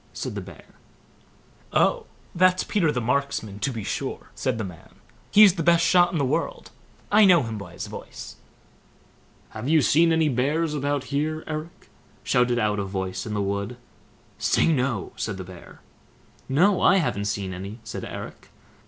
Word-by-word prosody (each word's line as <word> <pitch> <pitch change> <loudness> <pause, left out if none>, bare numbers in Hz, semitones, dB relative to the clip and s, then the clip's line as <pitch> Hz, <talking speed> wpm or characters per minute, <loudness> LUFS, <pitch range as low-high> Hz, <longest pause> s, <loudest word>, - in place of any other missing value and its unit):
said - - -5
the - - -4
Bear. - - -13 1.1
"Oh! 485 -2 +2 0.3
that's 185 +1 +3
Peter 175 -8 +1
the 125 - -1
Marksman, 120 -4 -2
to 140 - -1
be 115 -4 -5
sure", - - -4
said 130 -4 -2
the 110 - -3
than; 90 -4 -11 0.3
"he's 205 -3 +7
the 175 - -3
best 170 +1 +4
shot 175 -1 +4
in 175 - -2
the 140 - +1
world. 480 - -2 0.4
I 210 +1 +6
know 180 -6 +6
him 115 -2 -5
by 90 -3 -10
his - - -6
voice." - - -9 1.1
"Have 110 +5 -5
you 155 -2 +4
seen 165 +6 +4
any 160 -1 +3
bears 150 +5 0
about 145 -1 -1
here, 155 +2 -1
Eric?" 155 +2 -7 0.3
shouted 125 -1 +2
out 105 -2 +1
a - - -1
voice 95 0 -4
in 105 - -3
the 100 - 0
wood. 100 +4 -3 0.6
"Say, 165 - +2
no!" 125 -7 -1
said 105 -3 -3
the 95 - -6
Bear. 90 -1 -13 0.7
"No, 180 +8 +3
I 195 - +5
haven't 105 - -1
seen 100 -2 -3
any", 100 +4 -7
said 110 - -6
Eric. - - -8
135 Hz, 170 wpm, -24 LUFS, 105-165 Hz, 1.1 s, he's